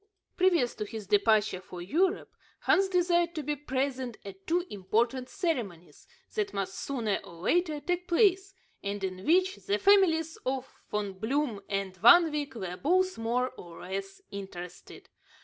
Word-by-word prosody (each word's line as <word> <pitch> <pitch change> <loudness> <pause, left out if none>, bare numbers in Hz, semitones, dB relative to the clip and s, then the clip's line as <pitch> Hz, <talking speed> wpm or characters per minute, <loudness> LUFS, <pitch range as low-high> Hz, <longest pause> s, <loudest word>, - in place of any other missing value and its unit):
Previous 345 -10 +3
to 215 - -4
his 215 0 -7
departure 205 -1 +3
for 180 -1 -10
Europe, 350 - 0 0.3
Hans 390 +1 +3
desired 345 -2 +2
to 310 - -3
be 295 +2 -1
present 265 -3 -2
at 195 -1 -11
two 345 +2 +1
important 230 +6 0
ceremonies 225 - -4 0.3
that 420 -2 -2
must 195 -1 -2
sooner 225 -4 -2
or 170 - -12
later 310 - +1
take 355 +3 -2
place, 385 +1 +3 0.3
and 200 0 -4
in 185 0 -4
which 370 - +3
the 405 0 -1
families 380 -6 +3
of 260 0 -3 0.2
Von 205 -2 -2
Bloom 240 -1 -1
and 195 -2 -2
Van 320 - +7
Wyk 295 -3 -3
were 185 -5 -5
both 370 - +1
more 245 +3 0
or 170 -8 -12
less 195 +1 -6
interested. 190 -3 -9
255 Hz, 150 wpm, -29 LUFS, -, 0.3 s, Van